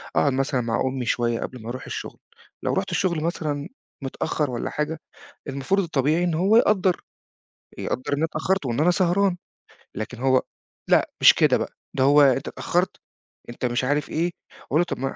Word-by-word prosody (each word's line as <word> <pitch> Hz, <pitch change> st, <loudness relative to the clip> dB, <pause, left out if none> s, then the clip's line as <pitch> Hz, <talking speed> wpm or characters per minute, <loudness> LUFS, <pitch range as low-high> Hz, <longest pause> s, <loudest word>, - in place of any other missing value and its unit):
أقعد 140 Hz, -, +3 dB
مثلًا 135 Hz, -1 st, 0 dB
مع 115 Hz, -1 st, -1 dB
أمي 130 Hz, -1 st, -2 dB
شوية 120 Hz, 0 st, 0 dB
قبل 125 Hz, -, -6 dB
ما 110 Hz, -, -7 dB
أرُوح 125 Hz, 0 st, -6 dB
الشغل، -, -, -6 dB, 0.4 s
لو -, -, 0 dB
رحُت -, -, -1 dB
الشغل 170 Hz, -5 st, 0 dB
مثلًا 150 Hz, -4 st, -2 dB, 0.3 s
متأخّر 145 Hz, +1 st, -2 dB
والَّا 120 Hz, -, -3 dB
حاجة، 150 Hz, +1 st, -3 dB, 0.5 s
المفروض 140 Hz, +9 st, 0 dB
الطبيعي 160 Hz, +2 st, +1 dB
إن 175 Hz, -, 0 dB
هو 190 Hz, +7 st, +3 dB
يقدّر، 195 Hz, -6 st, +3 dB, 0.8 s
يقدّر 130 Hz, -, -3 dB
إن 145 Hz, -, +3 dB
أنا 160 Hz, -, +1 dB
اتأخّرت، 165 Hz, +1 st, -1 dB
وإن 120 Hz, +3 st, -1 dB
أنا 175 Hz, -, +4 dB
سهران، 185 Hz, +1 st, +2 dB, 0.6 s
لكن 110 Hz, +4 st, -5 dB
هو 130 Hz, 0 st, +3 dB, 0.5 s
لأ -, -, +3 dB
مش -, -, +9 dB
كده -, -, +4 dB
بقى -, -, -3 dB, 0.2 s
ده 130 Hz, -, +3 dB
هو 145 Hz, +2 st, +6 dB
أنت 135 Hz, 0 st, +3 dB
اتأخّرت، 180 Hz, +2 st, -1 dB, 0.5 s
أنت 120 Hz, +1 st, -7 dB
مش 120 Hz, +1 st, 0 dB
عارف 145 Hz, +3 st, 0 dB
إيه، 170 Hz, +3 st, 0 dB, 0.4 s
أقول 150 Hz, -, +1 dB
له -, -, +3 dB
طَب -, -, -5 dB
ما 135 Hz, +1 st, -3 dB
145 Hz, 180 wpm, -24 LUFS, 130-170 Hz, 0.8 s, مش